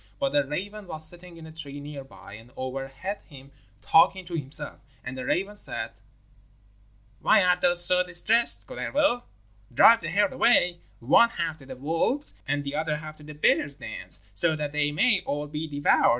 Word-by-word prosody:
But 140 +1 -1
a 145 - +4
raven 195 +8 -6
was 155 -2 +1
sitting 175 +1 -6
in 165 - -11
a 160 - -11
tree 145 -3 -6
near 145 -1 -8
by 135 - -14
and 115 +3 -12
overhead 135 +9 -5
him 140 -2 -14 0.3
talking 185 +3 +4
to 175 - -10
himself, 145 -3 -2 0.2
and 125 +2 -6
the 130 - -5
raven 195 +8 -1
said: - - -3 1.3
'Why 210 - +4
art 180 0 +2
thou 175 0 +3
so 180 +1 +5
distressed, 180 +6 +3
Kullervo? 285 -4 0 0.5
Drive 225 - +6
the 170 - -4
herd 200 +3 +1
away, 180 -7 +3 0.2
one 150 - +5
half 170 -6 -4
to 135 - -15
the 130 - -8
wolves' 165 - -1
and 145 +1 -1
the 140 0 -5
other 155 0 -1
half 155 0 -9
to 150 - -15
the 150 0 -10
bears' 145 -1 +2
dens, - - -6
so 160 +8 0
that 150 -1 -4
they 150 0 0
may 195 +6 +2
all 145 +1 -3
be 150 +2 -5
devoured. 145 -1 +3
155 Hz, 185 wpm, -26 LUFS, 145-180 Hz, 1.3 s, Drive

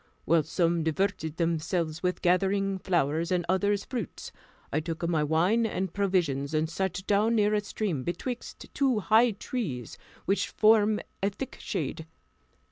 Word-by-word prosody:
While 165 +2 +4
some 165 +2 +1
diverted 160 -1 -1
themselves 165 -1 -1
with 180 0 -1
gathering 195 +2 +2
flowers, 170 -2 0
and 180 -2 +1
others 200 +2 +1
fruits, 240 -8 -5 0.4
I 150 - +2
took 165 +1 -3
my 160 -3 +1
wine 175 +10 +2
and 190 -4 -3
provisions, 165 -8 0
and 155 +1 +2
sat 185 +2 -3
down 210 +3 +2
near 210 -1 +3
a 210 - +2
stream 200 -7 -2
betwixt 240 - -5
two 260 -6 +2
high 225 +4 +5
trees, 195 - -5 0.3
which 195 - +1
formed 215 -1 +4 0.2
a 200 - +2
thick 260 +6 -7
shade. 160 -2 -4
185 Hz, 145 wpm, -28 LUFS, 160-205 Hz, 0.4 s, high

